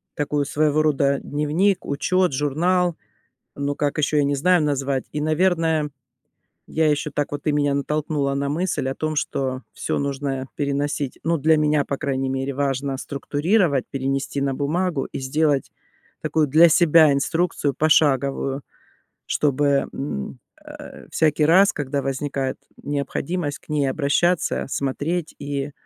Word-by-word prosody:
такую, 145 Hz, 0 st, 0 dB
своего 150 Hz, +1 st, +1 dB
рода, 140 Hz, -2 st, +2 dB
дневник, 160 Hz, +7 st, 0 dB
учёт, 180 Hz, +4 st, +1 dB
журнал, 170 Hz, +6 st, +1 dB, 0.6 s
ну 140 Hz, 0 st, -2 dB
как 145 Hz, +1 st, -1 dB
ещё, 150 Hz, 0 st, +1 dB
я 145 Hz, -, +4 dB
не 140 Hz, 0 st, +1 dB
знаю, 180 Hz, +4 st, +3 dB
назвать. 140 Hz, -2 st, -1 dB
И, 150 Hz, -, -2 dB
наверное, 160 Hz, -1 st, +1 dB, 0.8 s
я 160 Hz, 0 st, +1 dB
ещё 150 Hz, +1 st, -1 dB
так 145 Hz, 0 st, -1 dB
вот, 145 Hz, 0 st, -4 dB
ты 150 Hz, -, +1 dB
меня 145 Hz, -1 st, +1 dB
натолкнула 145 Hz, -1 st, -1 dB
на 140 Hz, 0 st, -1 dB
мысль 150 Hz, -3 st, -1 dB
о 135 Hz, -, -2 dB
том, 155 Hz, 0 st, -2 dB
что 130 Hz, -2 st, -2 dB
всё -, -, -2 dB
нужно 135 Hz, -1 st, -3 dB
переносить, 140 Hz, -1 st, -2 dB
ну, 165 Hz, 0 st, +2 dB
для 160 Hz, +2 st, +3 dB
меня, 150 Hz, -1 st, +2 dB
по 140 Hz, -, -3 dB
крайней 135 Hz, -2 st, -1 dB
мере, 135 Hz, +1 st, -2 dB
важно 135 Hz, 0 st, -1 dB
структурировать, 145 Hz, -, 0 dB
перенести 135 Hz, +1 st, -2 dB
на 140 Hz, 0 st, 0 dB
бумагу 155 Hz, +2 st, -1 dB
и -, -, -4 dB
сделать 145 Hz, +1 st, 0 dB, 0.5 s
такую 155 Hz, -2 st, +1 dB
для 160 Hz, +5 st, +7 dB
себя 160 Hz, -2 st, +5 dB
инструкцию 145 Hz, 0 st, 0 dB
пошаговую. 140 Hz, -2 st, +2 dB, 0.6 s
Чтобы, 140 Hz, -1 st, +1 dB
мм, 100 Hz, -, -5 dB, 0.3 s
э, -, -, -11 dB
всякий 155 Hz, -1 st, +2 dB
раз, 185 Hz, +6 st, +5 dB
когда 140 Hz, -1 st, -3 dB
возникает 135 Hz, 0 st, -2 dB, 0.3 s
необходимость 145 Hz, +2 st, -3 dB
к -, -, -28 dB
ней 150 Hz, -3 st, +1 dB
обращаться, 160 Hz, +5 st, +1 dB
смотреть 150 Hz, +5 st, -2 dB
и 140 Hz, 0 st, -3 dB
145 Hz, 140 wpm, -22 LUFS, 140-155 Hz, 0.8 s, для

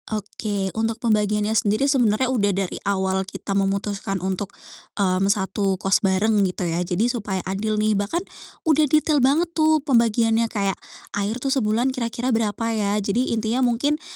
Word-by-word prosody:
Oke, 205 Hz, -2 st, -3 dB
untuk 225 Hz, 0 st, -1 dB
pembagiannya 210 Hz, -1 st, +1 dB
sendiri 215 Hz, +4 st, +2 dB
sebenarnya 260 Hz, -4 st, +2 dB
udah 205 Hz, -5 st, +2 dB
dari 195 Hz, -1 st, -3 dB
awal 190 Hz, -1 st, 0 dB
kita 195 Hz, +1 st, -6 dB
memutuskan 195 Hz, 0 st, -1 dB
untuk, 190 Hz, +2 st, -3 dB, 0.5 s
mmm, 195 Hz, -1 st, +1 dB
satu 195 Hz, -1 st, 0 dB
kos 195 Hz, +1 st, +2 dB
bareng 205 Hz, +2 st, +2 dB
gitu 185 Hz, -1 st, -1 dB
ya 170 Hz, +1 st, -1 dB
jadi 180 Hz, +4 st, 0 dB
supaya 220 Hz, -6 st, -2 dB
adil 210 Hz, +3 st, -2 dB
nih 215 Hz, 0 st, +2 dB
bahkan, 205 Hz, -, -1 dB, 0.4 s
udah 310 Hz, -2 st, +3 dB
detail 305 Hz, -1 st, +3 dB
banget 315 Hz, +7 st, +2 dB
tuh 315 Hz, -1 st, +3 dB
pembagiannya 230 Hz, -3 st, +2 dB
kayak, 200 Hz, -3 st, -1 dB, 0.4 s
air 205 Hz, +3 st, -1 dB
tuh 270 Hz, +1 st, -1 dB
sebulan 240 Hz, +1 st, +1 dB
kira-kira 245 Hz, 0 st, -2 dB
berapa 225 Hz, 0 st, -1 dB
ya, 205 Hz, -1 st, 0 dB
jadi 210 Hz, +5 st, 0 dB
intinya 225 Hz, +3 st, 0 dB
mungkin, 260 Hz, +5 st, +1 dB
215 Hz, 155 wpm, -22 LUFS, 195-240 Hz, 0.5 s, udah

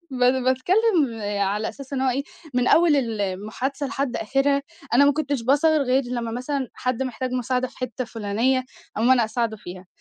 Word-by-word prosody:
بات 255 Hz, 0 st, +2 dB
باتكلم 280 Hz, -, +2 dB, 0.2 s
على 205 Hz, +2 st, 0 dB
أساس 275 Hz, 0 st, -10 dB
إن 265 Hz, -, -1 dB
هو 265 Hz, -1 st, +2 dB
إيه 270 Hz, +3 st, -1 dB, 0.3 s
من 250 Hz, 0 st, +2 dB
أول 330 Hz, -3 st, +5 dB
المحادثة 225 Hz, +4 st, -2 dB
لحد 275 Hz, -1 st, -2 dB
آخرها 275 Hz, +5 st, +1 dB, 0.3 s
أنا 280 Hz, +3 st, +7 dB
ما 285 Hz, -, +5 dB
كنتش 285 Hz, -4 st, -2 dB
باظهر 295 Hz, +4 st, +3 dB
غير 265 Hz, +1 st, +2 dB
لمّا 240 Hz, -2 st, -3 dB
مثلًا 260 Hz, +2 st, -3 dB
حد 255 Hz, 0 st, -2 dB
محتاج 255 Hz, 0 st, -3 dB
مساعدة 255 Hz, 0 st, -1 dB
في -, -, -19 dB
حِتّة 255 Hz, 0 st, -3 dB
فلانية، 230 Hz, +4 st, 0 dB, 0.3 s
أقوم 230 Hz, +4 st, +2 dB
أنا 245 Hz, -3 st, +5 dB
أساعده 220 Hz, 0 st, -2 dB
فيها 180 Hz, -2 st, -10 dB
255 Hz, 175 wpm, -23 LUFS, 230-275 Hz, 0.3 s, أنا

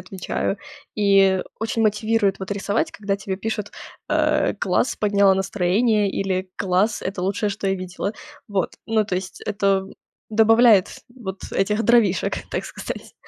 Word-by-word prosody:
отвечаю. 195 Hz, +1 st, -3 dB, 0.4 s
И 195 Hz, -2 st, +4 dB, 0.2 s
очень 225 Hz, +1 st, -1 dB
мотивирует 215 Hz, -1 st, +1 dB
вот 190 Hz, 0 st, -7 dB
рисовать, 205 Hz, +9 st, -1 dB
когда 200 Hz, -1 st, -2 dB
тебе 195 Hz, -1 st, -4 dB
пишут, 210 Hz, 0 st, -4 dB, 0.4 s
э: -, -, +2 dB
"Класс, -, -, 0 dB
подняла 200 Hz, -2 st, +3 dB
настроение" 200 Hz, +3 st, +1 dB
или 190 Hz, -1 st, -2 dB
"Класс. 195 Hz, +3 st, +1 dB
Это 185 Hz, -1 st, -4 dB
лучшее, 200 Hz, +2 st, 0 dB
что 200 Hz, 0 st, -4 dB
я 195 Hz, -, +2 dB
видела". 185 Hz, +2 st, -4 dB, 0.4 s
Вот. 195 Hz, -3 st, -1 dB
Ну, 220 Hz, -1 st, +2 dB
то 195 Hz, -, -3 dB
есть 185 Hz, +1 st, -5 dB
это 195 Hz, -2 st, +1 dB, 0.4 s
добавляет 225 Hz, -2 st, +5 dB, 0.3 s
вот, 195 Hz, -7 st, -7 dB
этих 210 Hz, +3 st, +1 dB
дровишек, 225 Hz, -5 st, +3 dB, 0.2 s
так -, -, -2 dB
сказать. -, -, -7 dB
200 Hz, 140 wpm, -22 LUFS, 190-215 Hz, 0.4 s, добавляет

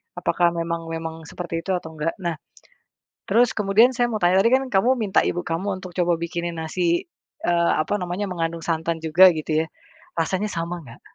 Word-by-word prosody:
apakah 175 Hz, 0 st, +1 dB
memang 165 Hz, 0 st, -3 dB
memang 165 Hz, 0 st, -5 dB
seperti 170 Hz, -2 st, -4 dB
itu 190 Hz, -, -3 dB
atau 160 Hz, -2 st, -5 dB
nggak 155 Hz, +2 st, -1 dB
nah, 170 Hz, -2 st, -1 dB, 0.9 s
terus 230 Hz, +2 st, +3 dB
kemudian 210 Hz, +4 st, +5 dB
saya 240 Hz, 0 st, +3 dB
mau 215 Hz, -, -2 dB
tanya 180 Hz, +2 st, +4 dB
tadi 230 Hz, -, +4 dB
kan 265 Hz, -, +3 dB
kamu 205 Hz, +4 st, +3 dB
minta 210 Hz, -4 st, +2 dB
ibu 175 Hz, -, -1 dB
kamu 185 Hz, +3 st, -3 dB
untuk 185 Hz, -, -7 dB
coba 175 Hz, -1 st, +2 dB
bikinin 170 Hz, 0 st, -3 dB
nasi, 170 Hz, -, 0 dB, 0.4 s
eee, 170 Hz, -1 st, +3 dB
apa 155 Hz, -, -1 dB
namanya 180 Hz, +2 st, -3 dB
mengandung 165 Hz, -1 st, -2 dB
santan 165 Hz, 0 st, -1 dB
juga 165 Hz, +4 st, +7 dB
gitu 155 Hz, 0 st, 0 dB
ya, -, -, -10 dB, 0.5 s
rasanya 190 Hz, +5 st, 0 dB
sama 170 Hz, +1 st, -3 dB
nggak? 115 Hz, -2 st, -13 dB
175 Hz, 185 wpm, -23 LUFS, 165-190 Hz, 0.9 s, juga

